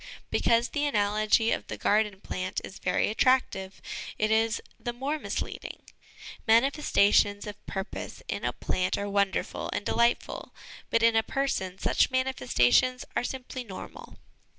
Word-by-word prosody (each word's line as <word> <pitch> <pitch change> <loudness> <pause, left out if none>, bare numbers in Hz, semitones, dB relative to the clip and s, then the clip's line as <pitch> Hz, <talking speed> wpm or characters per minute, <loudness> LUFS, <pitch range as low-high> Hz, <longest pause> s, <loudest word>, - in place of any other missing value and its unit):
Because 235 +1 +3
the 290 0 0
analogy 215 -1 +2
of - - -2
the - - -5
garden 210 -2 +1
plant 185 0 -3
is 190 - -9
very 180 - +1
attractive, 215 -6 +1 0.4
it 215 +1 +1
is 225 +1 +2 0.2
the 240 - -4
more 275 +5 -2
misleading; - - -5 0.7
manifestations 220 -5 +4
of 210 -1 -8
purpose 195 +1 -5
in - - -3
a - - +1
plant 185 0 -1
are 200 - -3
wonderful 200 -1 -1
and 205 - -3
delightful, 235 +1 0 0.3
but 230 - +2
in 230 0 +5
a 225 - +5
person 220 -7 -2
such - - +2
manifestations 255 - +2
are - - +1
simply 255 0 -5
normal. 195 -5 -10
220 Hz, 140 wpm, -28 LUFS, 200-250 Hz, 0.7 s, in